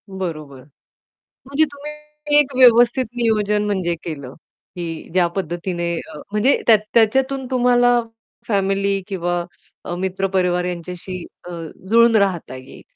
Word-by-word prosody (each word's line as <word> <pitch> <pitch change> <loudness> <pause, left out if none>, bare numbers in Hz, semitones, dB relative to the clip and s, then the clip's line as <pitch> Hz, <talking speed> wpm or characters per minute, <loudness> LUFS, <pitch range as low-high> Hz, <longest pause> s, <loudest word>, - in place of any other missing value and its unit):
बरोबर, 155 -8 -6 0.9
म्हणजे 280 +3 +2
तुम्ही 300 +1 -6
एक 280 -2 0
व्यवस्थित 245 0 +5
नियोजन 210 -3 +1
म्हणजे 185 -4 -1
केलं, 140 -6 -6 0.4
की 165 -2 -6
ज्या 180 -2 +3
पद्धतीने 175 -1 -3
अ, 160 - -10
म्हणजे 210 +7 +2
त्या 225 - +8 0.2
त्याच्यातून 265 +4 +2
तुम्हाला 245 -1 +4 0.5
फॅमिली 195 -1 0
किंवा 175 -2 -2 0.4
अ, 175 - -4
मित्र 190 +1 -2
परिवार 180 -1 +1
यांच्याशी 180 +1 -6 0.2
अ, - - -10 0.4
जुळून 230 +1 +5
राहता 190 - +1
येईल. 130 0 -12
195 Hz, 120 wpm, -20 LUFS, 175-245 Hz, 0.9 s, त्या